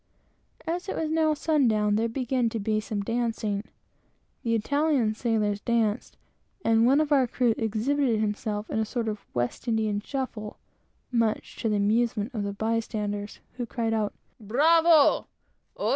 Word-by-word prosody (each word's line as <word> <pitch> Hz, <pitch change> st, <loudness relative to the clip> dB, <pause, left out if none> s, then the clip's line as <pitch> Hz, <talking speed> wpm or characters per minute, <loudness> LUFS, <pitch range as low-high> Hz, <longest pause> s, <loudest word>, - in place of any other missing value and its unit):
As 350 Hz, +3 st, -3 dB
it -, -, -2 dB
was 315 Hz, -1 st, -2 dB
now 315 Hz, -1 st, +2 dB
sundown, 230 Hz, -10 st, +2 dB
there 225 Hz, +2 st, +1 dB
began 250 Hz, 0 st, 0 dB
to 225 Hz, -, -4 dB
be 215 Hz, +1 st, 0 dB
some 210 Hz, -1 st, -3 dB
dancing. 225 Hz, -2 st, -1 dB, 0.8 s
The 230 Hz, -1 st, 0 dB
Italian 280 Hz, -1 st, +1 dB
sailors 215 Hz, -3 st, 0 dB
danced, 225 Hz, -3 st, 0 dB, 0.5 s
and 225 Hz, +1 st, +4 dB
one 275 Hz, +3 st, +5 dB
of 305 Hz, -1 st, 0 dB
our 270 Hz, -3 st, +4 dB
crew 240 Hz, -1 st, +1 dB
exhibited 230 Hz, +2 st, 0 dB
himself 210 Hz, 0 st, -2 dB
in -, -, 0 dB
a -, -, +2 dB
sort 230 Hz, +1 st, -3 dB
of 210 Hz, -1 st, -4 dB
West 120 Hz, -, -2 dB
India 220 Hz, -2 st, +1 dB
shuffle, 235 Hz, -6 st, -5 dB, 0.5 s
much 230 Hz, -3 st, 0 dB
to 225 Hz, -, -1 dB
the 210 Hz, -, +1 dB
amusement 220 Hz, +2 st, +1 dB
of 215 Hz, -, -2 dB
the 200 Hz, 0 st, -2 dB
bystanders, 210 Hz, -1 st, -3 dB, 0.2 s
who 245 Hz, -2 st, -3 dB
cried 230 Hz, -2 st, -1 dB
out, 215 Hz, -2 st, 0 dB, 0.3 s
"Bravo!" 310 Hz, +8 st, +4 dB
225 Hz, 150 wpm, -27 LUFS, 215-260 Hz, 0.8 s, one